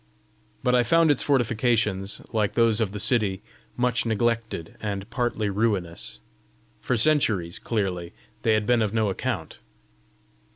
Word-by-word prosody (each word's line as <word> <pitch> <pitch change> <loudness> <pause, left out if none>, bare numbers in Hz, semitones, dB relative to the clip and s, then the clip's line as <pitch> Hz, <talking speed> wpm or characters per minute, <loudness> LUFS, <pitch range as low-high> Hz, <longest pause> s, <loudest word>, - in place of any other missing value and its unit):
But 125 - +2
I 125 - +5
found 165 +4 +4
its 145 - +1
fortifications, 115 -6 +1
like 105 -3 0
those 115 -1 +3
of 105 -4 0
the 105 - -5
city, 100 -4 +1 0.3
much 125 -1 +2
neglected, 115 -6 -1
and 100 -2 -4
partly 120 -3 -1
ruinous. 100 - -1 0.6
For 125 - -1
centuries, 110 - +2
clearly, 95 -6 -2 0.3
they 110 -1 +3
had 110 -1 0
been 120 +1 +3
of 110 0 -1
no 110 -3 +2
account! - - -4
110 Hz, 135 wpm, -25 LUFS, 100-120 Hz, 0.6 s, I